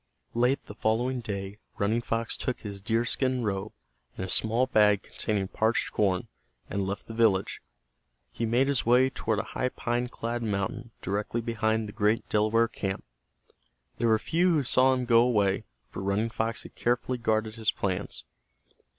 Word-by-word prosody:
Late 125 +3 +2
the - - -9
following 120 +5 0
day 100 -3 -5 0.2
Running 110 +4 +1
Fox 115 0 -2
took 125 - -3
his 100 -2 -6
deer 115 +3 +1
skin 130 0 0
robe, 100 0 -2 0.5
and 95 - -3
a - - -7
small 115 +6 +3
bag 105 -5 +4
containing 100 -3 -2
parched 110 +4 0
corn, 95 -3 +1 0.4
and 100 -1 -1
left 100 +1 -4
the 115 - -8
village. 110 -4 +2 0.7
He 115 - -2
made 125 +4 +3
his 140 -3 +1
way 125 +3 +4
toward 110 -5 -1
a - - 0
high 130 - 0
pine 120 0 -1
clad 120 0 -4
mountain 110 +2 -2
directly 105 +5 -1
behind 110 -1 0
the 105 - -9
great 105 +1 +1
Delaware 110 +2 +3
camp. 95 -4 -4 1.0
There 120 - +2
were 110 -1 +5
few 170 +10 +1
who 150 -3 +2
saw 130 +1 +4
him 125 -1 -2
go 115 -1 +5
away, 105 -6 +2 0.3
for - - -6
Running 100 +4 0
Fox 115 +1 -2
had - - -12
carefully 125 +1 0
guarded 110 -1 0
his 110 -2 0
plans. 95 -3 -2
110 Hz, 170 wpm, -28 LUFS, 105-120 Hz, 1.0 s, were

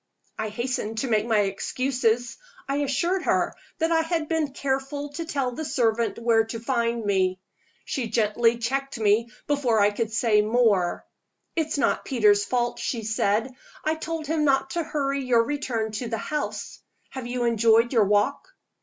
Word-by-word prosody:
I 220 - -2
hastened 225 -1 -3
to 265 - -1
make 215 -1 +1
my 220 -3 +3
excuses. 245 - -1 0.3
I 275 - -1
assured 315 +7 0
her - - +1 0.2
that 325 0 0
I 325 -1 +4
had 325 -1 -1
been 320 -3 0
careful 275 +1 -2
to 330 +4 -5
tell 275 -5 -1
the 310 +6 -5
servant 235 -5 0
where 230 -1 +3
to 225 +1 -6
find 235 -2 -1
me. 190 -2 +1 0.5
She 255 -4 -2
gently 230 +1 +2
checked 270 +2 -2
me 220 +2 +2 0.2
before 265 -6 +1
I 205 0 +4
could 225 +1 -2
say 225 -2 +3
more. 210 -5 +2 0.5
"It's 315 -2 -1
not 285 - +1
Peter's 210 -5 +3
fault," 240 -1 -1
she 230 -3 -2
said. 220 +3 0 0.3
"I 310 - +2
told 320 0 -4
him 310 +1 0
not 270 -2 +2
to 345 - -1
hurry 275 -3 -1
your 240 -2 +3
return 235 -5 -2
to 225 +3 -4
the 225 0 -2
house. 300 +7 -4 0.3
Have 260 -2 -6
you 245 0 -2
enjoyed 230 +1 +3
your 225 -4 +5
walk?" 210 - 0
240 Hz, 170 wpm, -25 LUFS, 225-280 Hz, 0.5 s, your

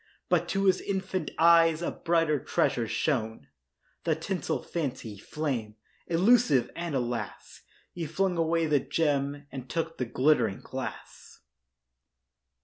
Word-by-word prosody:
But - - +2
to 195 0 0
his 190 -1 +3
infant 190 -4 -2
eyes 165 0 +5
A - - -1
brighter 165 -3 +1
treasure 120 -1 0
shone— 110 - -1 0.6
The 160 - +1
tinsel 180 +4 -3
Fancy, 130 - -4
flame 120 -5 -3 0.3
Illusive; 170 - +4
and 170 -3 -3
alas, 120 -2 -4 0.3
He 170 -2 -5
flung 185 +4 0
away 165 0 +1
the 150 -2 +3
gem 145 -1 -1
And 130 -1 -8
took 165 +2 -3
the 125 - 0
glittering 120 -4 +2
glass. - - -8
155 Hz, 125 wpm, -28 LUFS, 130-170 Hz, 0.6 s, eyes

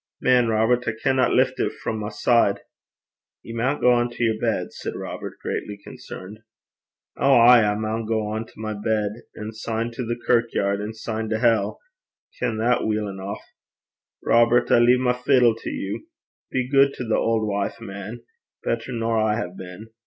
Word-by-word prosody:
Man, 125 -2 +3
Robert, 115 +3 +2
I 110 - +1
canna 130 +3 +1
lift - - +2
it - - 0
frae - - -4
my 105 -1 -4
side.' 115 +2 +2 0.8
'Ye 115 - -8
maun 130 +5 0
gang 120 -1 +3
to 120 - -4
yer 115 -1 +3
bed,' 110 -6 -1
said - - -6
Robert, - - -6
greatly 105 -1 -4
concerned. 100 0 -10 0.8
'Ow, 140 -1 +5
ay, 120 0 +8
I 105 0 +1
maun 110 +1 -3
gang 110 0 -2
to - - -19
my 110 0 -3
bed, 105 0 -1 0.2
and 110 +1 -7
syne 115 +1 -3
to 120 +2 -5
the 120 +1 -3
kirkyaird, 110 -4 +1
and 110 +2 -5
syne 110 0 -4
to 110 - 0
hell, 115 -3 +1
I - - -41
ken 120 -3 -1
that 120 +3 +2
weel 105 -1 0
eneuch. 95 +1 -6 0.8
Robert, 120 +1 +4
I - - +6
lea 120 +1 +5
my 125 -1 +2
fiddle 125 -1 +3
to 115 - -6
you. 100 - -5 0.4
Be 130 -1 -1
guid 140 +1 +4
to - - -5
the 115 -2 0
auld 115 -1 +1
wife, 100 -1 -2
man 105 +2 -8 0.4
better 115 +2 -2
nor 115 -1 0
I 110 -1 +2
hae 90 -6 -4
been. 95 +4 -10
115 Hz, 180 wpm, -23 LUFS, 105-120 Hz, 0.8 s, ay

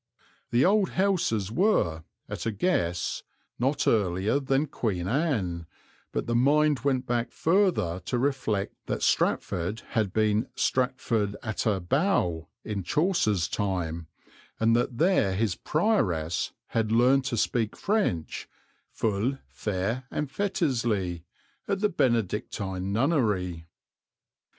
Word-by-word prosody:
The 120 +2 +3
old 200 +1 +3
houses 170 - +1
were, 115 - +2 0.2
at - - -4
a - - +1
guess, 90 - 0 0.4
not 135 +4 +1
earlier 100 +3 +2
than 135 +1 +1
Queen 100 - -2
Anne, 100 - -1 0.4
but - - -2
the 120 - -1
mind 145 +4 +3
went 130 0 0
back 120 -1 -1
further 165 - +2
to 125 - -1
reflect 125 -7 -1
that - - -2
Stratford 90 +6 0
had 110 -4 0
been 110 +1 +1
Stratford 120 -5 0
attè 105 -5 -1
Bowe 130 - +1 0.2
in 105 -2 -3
Chaucer's 105 - +1
time, 85 -6 -2 0.5
and 115 +1 +4
that 120 0 0
there 165 - +3
his 105 -1 +1
prioress 95 - 0 0.2
had 110 -1 0
learned 130 +4 +4
to 120 -4 -1
speak 110 0 0
French 195 - -1 0.4
"ful 115 +5 -1
faire 105 +5 -2
and 150 -2 -3
fetisly" 115 - -1 0.4
at 195 - 0
the 210 - +3
Benedictine 100 - -1
Nunnery. 105 - 0
115 Hz, 115 wpm, -27 LUFS, 95-140 Hz, 0.5 s, and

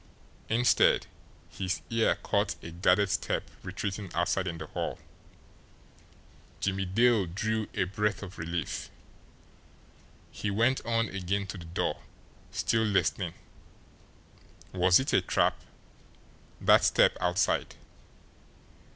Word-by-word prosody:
Instead, 120 +2 +4 0.5
his 95 0 -3
ear 115 -1 +3
caught - - 0
a 85 - -7
guarded 90 +3 +3
step - - -2
retreating 100 -1 -4
outside 95 +2 0
in 85 -2 -3
the 80 - -6
hall. - - -4 1.6
Jimmie 95 0 -1
Dale 110 0 +3
drew 110 +5 -2
a - - +2
breath 105 +2 -1
of 95 -2 -9
relief. 85 +1 -3 1.4
He 105 - -3
went 115 +6 +2
on 115 -2 +1
again 100 +1 -2
to 95 - -7
the 85 - -10
door, 85 +1 -2 0.5
still 115 - +1
listening. 105 -4 0 1.4
Was 90 0 +5
it 130 - -2
a - - +5
trap - - +1 1.0
that - - +5
step - - +4
outside? 90 +3 +1
100 Hz, 110 wpm, -29 LUFS, 90-110 Hz, 1.6 s, Was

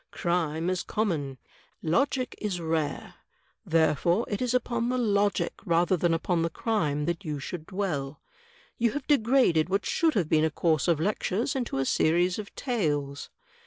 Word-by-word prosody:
Crime 170 -2 -1
is 185 - -1
common. 155 -11 -2 0.5
Logic 255 - +1
is 200 -4 -2
rare. 160 -3 -2 0.5
Therefore 165 +5 +2
it 205 - -2
is 250 -2 0
upon 235 -1 0
the 255 - 0
logic 205 -6 +1
rather 175 +2 +2
than 175 0 +1
upon 165 +1 0
the 165 - 0
crime 155 -7 -1
that 170 +4 -2
you 150 -4 -3
should 155 +3 -6
dwell. 155 -8 -3 0.6
You 235 -2 +2
have 290 -2 -4
degraded 230 - +3
what 195 +2 0
should 325 -2 +1
have 180 -7 +1
been 155 0 +3
a 160 - +3
cotirse 155 0 +1
of 170 -3 +2
lectures 210 - -1
into 245 - -2
a 135 - 0
series 175 +7 +2
of 205 - -8
tales." 145 - -2
175 Hz, 160 wpm, -27 LUFS, 160-215 Hz, 0.6 s, degraded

